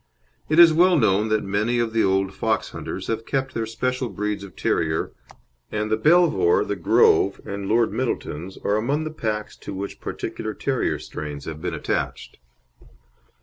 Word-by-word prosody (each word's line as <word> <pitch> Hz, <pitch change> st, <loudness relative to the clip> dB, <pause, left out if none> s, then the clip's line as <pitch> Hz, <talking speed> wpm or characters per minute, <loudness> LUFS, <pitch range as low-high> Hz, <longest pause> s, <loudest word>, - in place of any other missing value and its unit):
It 155 Hz, -, +2 dB
is 170 Hz, -2 st, +9 dB
well 175 Hz, +2 st, +5 dB
known 105 Hz, -4 st, +3 dB
that 110 Hz, 0 st, +1 dB
many 105 Hz, +5 st, 0 dB
of 115 Hz, -2 st, 0 dB
the 115 Hz, -, +3 dB
old 95 Hz, 0 st, +1 dB
fox -, -, -1 dB
hunters -, -, -6 dB
have 115 Hz, 0 st, -2 dB
kept 135 Hz, +1 st, -2 dB
their 115 Hz, -1 st, -2 dB
special 125 Hz, +2 st, -2 dB
breeds 105 Hz, +1 st, -3 dB
of 95 Hz, -2 st, -11 dB
terrier, 80 Hz, -1 st, 0 dB, 0.6 s
and 105 Hz, 0 st, -2 dB
the -, -, +4 dB
Belvoir, 175 Hz, -, +4 dB
the -, -, -2 dB
Grove, 425 Hz, -3 st, +3 dB
and 100 Hz, -1 st, -5 dB
Lord 115 Hz, 0 st, +3 dB
Middleton's 95 Hz, -, -3 dB
are 105 Hz, -, +1 dB
among 140 Hz, +8 st, 0 dB
the 155 Hz, -, -4 dB
packs 110 Hz, -7 st, -3 dB
to 100 Hz, -, -8 dB
which 100 Hz, +1 st, -6 dB
particular -, -, -5 dB
terrier -, -, -1 dB
strains 75 Hz, -2 st, -7 dB
have 80 Hz, -1 st, -6 dB
been -, -, -3 dB
attached. -, -, -3 dB
110 Hz, 170 wpm, -23 LUFS, 100-135 Hz, 0.6 s, is